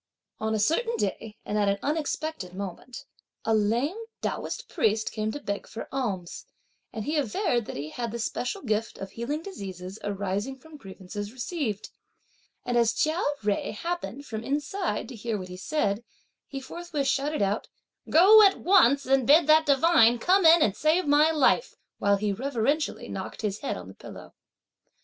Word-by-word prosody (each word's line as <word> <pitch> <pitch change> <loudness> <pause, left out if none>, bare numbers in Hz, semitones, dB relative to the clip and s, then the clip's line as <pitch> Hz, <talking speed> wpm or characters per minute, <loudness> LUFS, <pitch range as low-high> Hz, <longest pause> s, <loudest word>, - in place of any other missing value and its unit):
On 220 0 -1
a - - 0
certain 455 - +1
day 210 +2 -3
and 210 - -1
at 205 -1 +2
an 200 - +1
unexpected 300 - -3
moment, 200 +5 -7 0.4
a 225 - +2
lame 235 - +1 0.2
Taoist - - -3
priest 220 - 0
came 215 -1 -2
to 290 - -5
beg 200 -7 -4
for 225 - -7
alms, 200 -10 -4 0.4
and 220 - -5
he 305 +3 -1
averred 245 - 0
that - - -6
he 145 +2 -5
had 235 -2 -4
the 235 - -4
special 250 - -3
gift 220 -2 -1
of 195 - -7
healing 285 +7 -4
diseases 190 - -8
arising 205 +5 -3
from 320 +3 -15
grievances 205 -3 -8
received, 255 - -4 0.7
and 245 -1 +1
as 230 -1 +3
Chia 315 +4 0 0.2
Jui 205 0 -1
happened, 335 -3 -4
from 220 -3 -5
inside, 295 +5 -2
to 255 - -8
hear 225 0 -3
what 185 -2 -7
he 180 - -7
said, 205 -1 -1 0.4
he 275 - -6
forthwith 300 0 -4
shouted 280 -2 0
out: 200 +2 -1 0.4
"Go 400 +7 +8
at 395 -2 +5
once, 280 -8 +4
and 265 -2 +2
bid 310 +3 +7
that 310 +1 +5
divine 275 -4 +5
come 365 - +4
in 325 -1 +7
and 200 - +1
save 315 - +2
my 295 +2 +5
life!" 315 - +2 0.2
while 200 0 +3
he 205 0 -1
reverentially 275 +5 -1
knocked - - -6
his 210 -1 -2
head - - -3
on 90 0 -9
the - - -11
pillow. - - -12
245 Hz, 175 wpm, -27 LUFS, 210-310 Hz, 0.7 s, Go